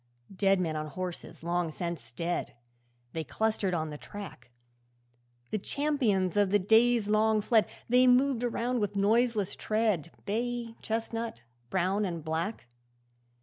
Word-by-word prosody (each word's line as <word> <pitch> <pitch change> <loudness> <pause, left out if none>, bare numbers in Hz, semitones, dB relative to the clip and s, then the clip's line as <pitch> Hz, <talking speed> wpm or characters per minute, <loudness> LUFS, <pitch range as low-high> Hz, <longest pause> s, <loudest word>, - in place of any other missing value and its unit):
'Dead 195 0 +3
men 165 -3 -1
on 155 0 -3
horses 180 +1 -6
long 175 0 0
since 170 +1 -5
dead, 170 +1 -3 0.6
They 160 - -2
clustered 215 0 0
on 160 -2 -2
the 150 - -7
track; 195 -12 -9 1.0
The 215 - 0
champions 225 - 0
of 205 -2 +3
the 205 - +4
days 225 +2 +4
long 215 +1 +3
fled, 215 +1 +3 0.2
They 250 +2 +5
moved 250 0 +4
around 245 +1 0
with 205 -1 -1
noiseless 215 0 +2
tread 215 -8 0 0.2
Bay, 235 +2 -2
chestnut, 225 - -3 0.3
brown, 190 +3 +1
and 170 -5 -3
black. 165 - -2
205 Hz, 135 wpm, -30 LUFS, 175-230 Hz, 1.0 s, They